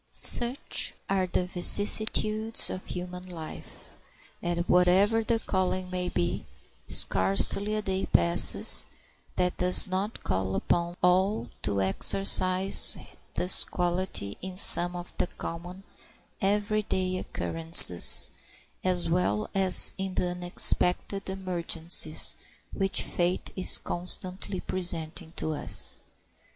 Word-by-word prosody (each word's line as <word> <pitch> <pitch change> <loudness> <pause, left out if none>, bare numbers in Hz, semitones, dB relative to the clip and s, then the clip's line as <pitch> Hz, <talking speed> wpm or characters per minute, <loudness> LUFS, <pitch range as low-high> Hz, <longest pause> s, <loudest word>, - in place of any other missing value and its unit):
Such 245 +3 +1 0.2
are 190 -1 -3
the 180 0 -5
vicissitudes 215 +4 +2
of 185 - -11
human 180 0 -10
life 165 -3 -14 0.4
that, 175 0 -6
whatever 190 +5 -1
the 230 +1 -4
calling 185 -3 -6
may 180 -1 -7
be, 90 - -6 0.4
scarcely 100 - +2
a 215 - -7
day 190 -1 -6
passes 85 0 +2 0.5
that 180 0 -5
does 180 +1 +4
not 190 +4 -8
call 95 +1 -6
upon 175 - -5
all 185 - -3
to 100 -1 -5
exercise 185 - +3 0.4
this 180 +1 +2
quality 175 - -7
in 185 0 -11
some 175 -2 +5
of 175 0 -12
the - - -3
common 175 +3 -12 0.6
every 210 +1 -4
day 185 -2 -6
occurrences, 165 - +7 0.5
as 180 -2 -4
well 165 - -4
as 190 -2 +3
in 190 -1 -8
the 180 - -5
unexpected 180 +2 -1
emergencies 170 -4 0 0.4
which 195 -1 -3
fate 175 +1 -5
is 185 - +2
constantly 185 +2 -4
presenting 170 -2 -6
to 155 - -7
us. 150 - -3
180 Hz, 110 wpm, -23 LUFS, 175-190 Hz, 0.6 s, occurrences